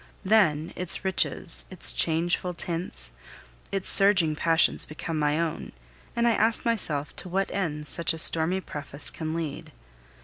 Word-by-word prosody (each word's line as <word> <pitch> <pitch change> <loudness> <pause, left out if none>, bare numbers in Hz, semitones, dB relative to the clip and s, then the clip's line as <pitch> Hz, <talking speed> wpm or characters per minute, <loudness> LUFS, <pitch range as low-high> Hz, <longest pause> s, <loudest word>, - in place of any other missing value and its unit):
Then, 170 -7 +1
its 180 +1 +1
riches, 60 - +3
its - - -1
changeful 170 - 0
tints, 165 - -6 0.6
its 195 -1 -4
surging 190 -6 +4
passions 165 +1 +1
become 155 +1 -6
my 150 +1 0
own, 165 -2 -5 0.4
and 235 0 0
I - - +3
ask 225 +1 +1
myself 155 -11 -1
to 185 - -8
what 195 +2 -2
end 150 -6 -4
such 170 - +2
a 165 - -6
stormy 165 +3 +4
preface 145 -3 -4
can 160 0 -6
lead. 160 -4 -6
165 Hz, 145 wpm, -25 LUFS, 150-190 Hz, 0.6 s, surging